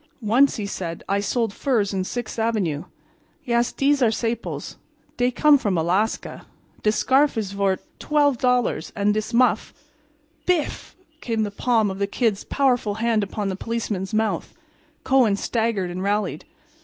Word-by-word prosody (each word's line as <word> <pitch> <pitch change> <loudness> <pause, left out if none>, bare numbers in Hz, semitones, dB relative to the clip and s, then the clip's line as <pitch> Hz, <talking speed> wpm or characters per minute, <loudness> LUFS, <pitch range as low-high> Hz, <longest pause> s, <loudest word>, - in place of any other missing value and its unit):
"Once," 245 +7 +4
he 210 - -3
said, 175 -4 -5
"I 200 +1 +1
sold 225 +1 -1
furs 220 -8 0
in 190 -1 -1
Sixth 240 +2 -5
avenue. 190 -9 0 0.6
Yes, 235 0 +1
dese 280 0 +2
are 240 - +5
saples. 230 +1 -3 0.4
Dey 245 0 +2
come 290 +3 +4
from 200 -7 0
Alaska. 185 +7 -1 0.3
Dis 215 0 +2
scarf 270 +3 +3
is 205 -3 -2
vort 200 -1 0 0.2
$12 255 -5 +1
and 205 0 +2
dis 215 +1 -2
muff—" 240 -2 +2 0.7
"Biff!" 355 -5 -1 0.3
came 225 -2 -1
the 205 - -3
palm 220 -1 +1
of 190 - -7
the 200 - +1
Kid's 215 -1 0
powerful 245 -7 +1
hand 225 0 +1
upon 200 0 -3
the 190 - -2
policeman's 210 -3 -3
mouth. 220 0 -1 0.5
Kohen 255 -6 +4
staggered 215 -4 -1
and 180 +1 -5
rallied. 200 -4 -1
220 Hz, 150 wpm, -23 LUFS, 200-245 Hz, 0.7 s, are